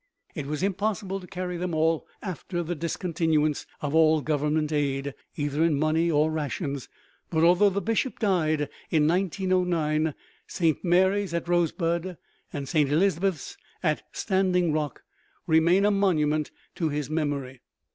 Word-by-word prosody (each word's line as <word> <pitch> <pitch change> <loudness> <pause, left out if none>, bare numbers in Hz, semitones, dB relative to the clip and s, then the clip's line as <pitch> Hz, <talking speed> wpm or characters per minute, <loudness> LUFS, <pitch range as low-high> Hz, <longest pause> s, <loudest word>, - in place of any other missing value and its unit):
It 140 - -5
was 150 +4 -3
impossible 195 0 -1
to 180 - -12
carry 180 -1 -4
them 175 -1 -2
all 160 0 +1 0.2
after 180 -2 -4
the 170 +2 -3
discontinuance 160 -2 0
of 145 -1 -2
all 160 -1 +5
Government 150 +1 0
aid, 140 -2 -1 0.2
either 145 +1 0
in 165 -3 +2
money 155 +3 +2
or 155 0 +2
rations, 140 -2 -3 0.4
but, 160 -1 +1
although 180 +4 +5
the 200 0 -2
Bishop 225 +5 0
died 155 -8 +1 0.2
in 155 -2 +3
1909, 175 -4 +1 0.3
Saint 165 -4 0
Mary's 190 +1 +2
at 170 - -2
Rosebud 170 0 0 0.3
and 140 -2 -5
Saint 150 -2 +2
Elizabeth's 180 -1 0 0.3
at 155 -3 +1
Standing 185 -4 +1
Rock 150 -3 -3 0.4
remain 170 +5 +4
a 210 - +4
monument 155 -7 +1 0.3
to 165 -3 0
his 145 -2 -2
memory. 145 -4 -3
160 Hz, 140 wpm, -26 LUFS, 150-180 Hz, 0.4 s, all